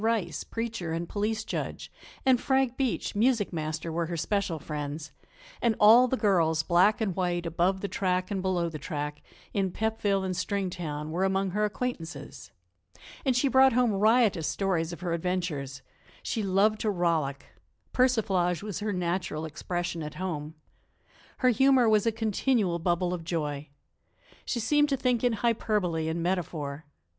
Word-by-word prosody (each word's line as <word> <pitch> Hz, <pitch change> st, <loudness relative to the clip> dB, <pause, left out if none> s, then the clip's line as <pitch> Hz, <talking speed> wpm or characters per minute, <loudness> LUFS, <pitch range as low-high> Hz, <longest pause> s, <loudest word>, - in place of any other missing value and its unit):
Rice, 215 Hz, -8 st, 0 dB
preacher 230 Hz, -8 st, -4 dB
and 170 Hz, +1 st, -3 dB
police 215 Hz, +3 st, -1 dB
judge, -, -, -5 dB, 0.3 s
and 255 Hz, -2 st, +4 dB
Frank 265 Hz, -2 st, +1 dB
Beach, 260 Hz, -3 st, -1 dB
music 225 Hz, -2 st, +2 dB
master, 160 Hz, +1 st, -3 dB
were 165 Hz, +1 st, -1 dB
her 170 Hz, 0 st, -4 dB
special 200 Hz, 0 st, -1 dB
friends, 150 Hz, 0 st, -5 dB, 0.5 s
and 230 Hz, -2 st, +2 dB
all 230 Hz, +4 st, +8 dB
the 260 Hz, -, 0 dB
girls, 165 Hz, -7 st, +2 dB
black 185 Hz, +7 st, +3 dB
and 195 Hz, -5 st, 0 dB
white, 175 Hz, -2 st, -1 dB
above 175 Hz, +3 st, +1 dB
the 200 Hz, -, -2 dB
track 185 Hz, -1 st, -1 dB
and 195 Hz, -2 st, -1 dB
below 185 Hz, -2 st, 0 dB
the 160 Hz, -2 st, -6 dB
track, 150 Hz, -1 st, -4 dB, 0.3 s
in 195 Hz, -2 st, +1 dB
Pepville 205 Hz, -1 st, 0 dB
and 185 Hz, -1 st, -2 dB
Stringtown, 175 Hz, -5 st, -3 dB
were 175 Hz, +4 st, 0 dB
among 195 Hz, 0 st, +1 dB
her 210 Hz, +3 st, +1 dB
acquaintances. 210 Hz, -6 st, -5 dB, 0.7 s
And 260 Hz, -3 st, +2 dB
she 250 Hz, +3 st, +3 dB
brought 265 Hz, 0 st, +5 dB
home 245 Hz, -2 st, +3 dB
riotous 210 Hz, -4 st, +3 dB
stories 165 Hz, 0 st, 0 dB
of 170 Hz, -, -8 dB
her 175 Hz, -2 st, -1 dB
adventures. 160 Hz, -6 st, -3 dB, 0.4 s
She 225 Hz, -, -2 dB
loved 205 Hz, +2 st, +2 dB
to 215 Hz, -, +1 dB
rollick; 165 Hz, -7 st, 0 dB, 0.5 s
persiflage 200 Hz, -9 st, +2 dB
was 205 Hz, -4 st, -4 dB
her 210 Hz, 0 st, -2 dB
natural 175 Hz, -3 st, -2 dB
expression 175 Hz, +2 st, -4 dB
at 150 Hz, -1 st, -6 dB
home. 160 Hz, -3 st, -4 dB, 0.8 s
Her 255 Hz, -, +3 dB
humor 260 Hz, 0 st, +4 dB
was 215 Hz, 0 st, +3 dB
a -, -, +4 dB
continual 220 Hz, -4 st, 0 dB
bubble 175 Hz, +1 st, 0 dB
of 175 Hz, -2 st, -4 dB
joy. 150 Hz, -3 st, -3 dB, 0.8 s
She 240 Hz, -, -2 dB
seemed 295 Hz, +6 st, +3 dB
to 275 Hz, -, +1 dB
think 250 Hz, -2 st, +1 dB
in 245 Hz, -1 st, +3 dB
hyperbole 210 Hz, -7 st, 0 dB
and 165 Hz, +1 st, -2 dB
metaphor. 155 Hz, -5 st, -3 dB
185 Hz, 160 wpm, -28 LUFS, 165-220 Hz, 0.8 s, all